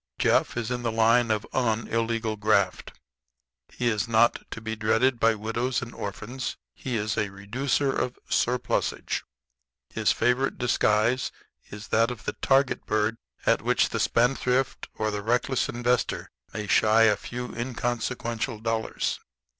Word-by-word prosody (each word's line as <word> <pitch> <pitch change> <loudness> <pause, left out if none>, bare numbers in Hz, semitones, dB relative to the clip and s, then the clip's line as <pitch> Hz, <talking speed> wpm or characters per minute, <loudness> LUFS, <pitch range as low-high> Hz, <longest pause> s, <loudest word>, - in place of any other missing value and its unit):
Jeff - - +2
is 120 0 -2
in 125 -1 -2
the 115 -1 -1
line 115 +1 +4
of 110 -1 0
unillegal 115 -1 0
graft. 100 -3 +1 0.8
He 120 - -2
is 110 -3 +1
not 115 +1 +3
to - - -6
be 110 0 -4
dreaded 115 +3 +2
by 115 0 +4
widows 115 +4 -2
and 120 - -8
orphans; 115 +5 -5 0.2
he 130 -2 -4
is 110 +1 -1
a 105 -2 0
reducer 125 +8 -1
of 125 - -2
surplusage. 125 0 0 0.7
His - - +2
favorite 125 +4 +1
disguise 120 0 +2 0.4
is 105 0 -9
that 115 +2 +3
of 120 -4 -7
the 105 - -2
target 135 0 +1
bird 110 +1 +1 0.3
at - - +3
which - - +2
the - - -2
spendthrift 125 +1 +1
or 110 0 -1
the 105 0 -3
reckless 120 +4 0
investor 120 +1 -1 0.2
may 105 -1 -4
shy 110 +2 +4
a 105 -2 +5
few 125 +3 -6
inconsequential 120 -1 -2
dollars. 115 0 -2
115 Hz, 145 wpm, -26 LUFS, 110-125 Hz, 0.8 s, a